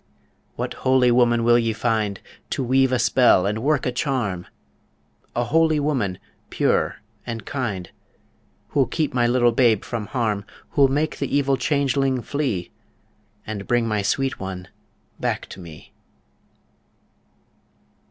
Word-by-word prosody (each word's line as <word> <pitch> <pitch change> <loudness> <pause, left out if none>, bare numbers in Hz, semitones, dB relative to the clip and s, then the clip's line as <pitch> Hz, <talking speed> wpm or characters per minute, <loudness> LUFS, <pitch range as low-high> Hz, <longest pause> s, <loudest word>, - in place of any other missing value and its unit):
What - - -3
holy 130 -1 +4
woman 120 -1 +3
will 120 +1 +5
ye 115 -1 0
find 110 -3 -1 0.3
To - - -2
weave 130 +1 +3
a 130 - +2
spell 120 -5 +4
and 105 +2 -1
work 145 +1 +1
a 125 - +1
charm? 120 -9 -2 0.9
A 120 - +1
holy 160 +3 +2
woman, 130 -11 -1 0.3
pure - - 0 0.2
and 115 -2 -6
kind, 105 -10 -4 0.8
Who'll 135 -3 +2
keep 155 -3 -1
my 120 -1 +2
little 120 0 +3
babe 115 -3 +3
from 115 -4 -4
harm 110 -6 -1 0.3
Who'll 140 -2 +5
make 150 +3 -1
the 140 0 0
evil 140 -1 +2
changeling 135 -3 0
flee, 130 - -2 0.7
And 105 -2 -6
bring 120 -1 +2
my 105 -2 0
sweet 135 +7 -1
one 95 -1 -6 0.5
back - - -2
to - - -10
me? 85 -4 -12
120 Hz, 135 wpm, -23 LUFS, 110-135 Hz, 0.9 s, will